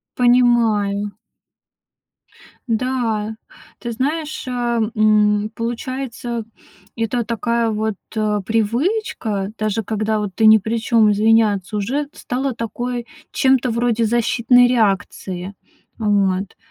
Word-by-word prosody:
Понимаю. 225 -5 +2 1.6
Да. 225 -3 -1 0.4
Ты 235 - -5
знаешь, 300 +5 -2
а, 240 -2 -1
м, 210 -1 +3
получается, 240 0 -4 0.5
это 230 +1 -1
такая 235 0 0
вот, 215 -1 -2 0.2
э, 210 -2 0
привычка- 225 - -1
даже 215 +1 -1
когда 215 +1 -1
вот 205 -2 -3
ты 220 - +3
ни 220 0 +8
при 225 +3 -2
чём- 225 -1 +3
извиняться, 210 -2 +2
уже 270 +8 -2
стала 260 +1 -3
такой, 240 +1 -4 0.3
чем-то 260 -2 +2
вроде 235 0 +1
защитной 240 +2 +3
реакции. 195 -4 -1 0.4
Вот. 200 -3 0
225 Hz, 100 wpm, -20 LUFS, 210-245 Hz, 1.6 s, ни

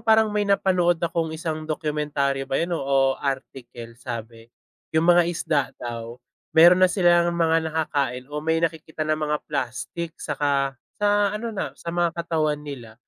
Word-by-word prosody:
parang 220 -1 +5
may 210 0 0
napanood 180 -4 +2
akong 165 -1 -1
isang 155 -1 -4
dokumentaryo 150 -3 -1
ba 135 - -3
yun 170 +1 -1
o, - - -4
o 135 0 +1 0.2
article. 125 -4 -5
Sabi 115 -2 -7 0.5
yung 160 +2 +3
mga 175 0 +6
isda 165 -3 0
daw 115 -1 -6 0.4
meron 175 +3 +8
na 185 - +6
silang 175 -2 +3
mga 165 -1 +2
nakakain 140 -5 -2
o 150 - -3
may 160 +2 0
nakikita 160 -1 -2
na 155 0 0
mga 150 -1 -1
plastik 125 +8 -4
saka 140 -3 0 0.2
sa 205 0 +3
ano 230 +2 -3
na 210 - -4
sa 170 - -6
mga 170 -1 0
katawan 155 -3 -1
nila. 125 -7 -8
160 Hz, 160 wpm, -24 LUFS, 140-170 Hz, 0.5 s, meron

